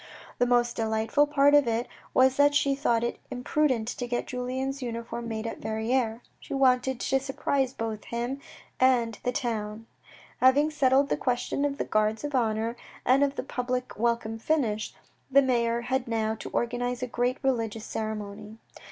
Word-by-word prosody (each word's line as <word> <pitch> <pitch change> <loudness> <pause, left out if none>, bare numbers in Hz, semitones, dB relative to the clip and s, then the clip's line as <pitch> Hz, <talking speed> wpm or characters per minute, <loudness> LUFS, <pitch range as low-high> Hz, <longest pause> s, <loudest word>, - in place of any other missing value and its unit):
The 245 - +3
most 240 -1 +2
delightful 225 +6 +1
part 285 -1 +4
of 290 -3 +6
it 230 +1 0 0.2
was 260 0 +4
that 285 0 +5
she 280 -1 +3
thought 240 -5 +1
it 235 - -2
imprudent 250 -2 0
to 245 0 -4
get 240 0 -2
Julien's 260 +2 -3
uniform 235 -1 -5
made 220 -1 -4
at 230 - -5
Verrieres. 220 +2 -1 0.2
She - - -6
wanted 260 -1 +3
to 270 +1 +1
surprise 270 -1 -1
both 225 -4 -5
him 240 +4 -3 0.4
and 240 -4 +3
the 250 - 0
town. 225 -3 -3 0.5
Having 280 +4 +5
settled 275 -1 +3
the - - +1
questions 260 +3 0
of 280 0 -5
the - - -2
guards 215 +2 +1
of 295 0 -4
honour, 225 -2 0 0.3
and 265 +3 +5
of 280 -1 0
the - - -3
public 250 -1 -3
welcome 225 0 -1
finished, 225 -6 -1 0.3
the 275 +1 +6
mayor 235 -2 +1
had 260 +1 -1
now 220 -1 0
to 220 - -7
organise 245 +1 -1
a - - -1
great 245 +2 0
religious 225 -4 -1
ceremony. 210 0 -5
245 Hz, 170 wpm, -27 LUFS, 225-265 Hz, 0.5 s, of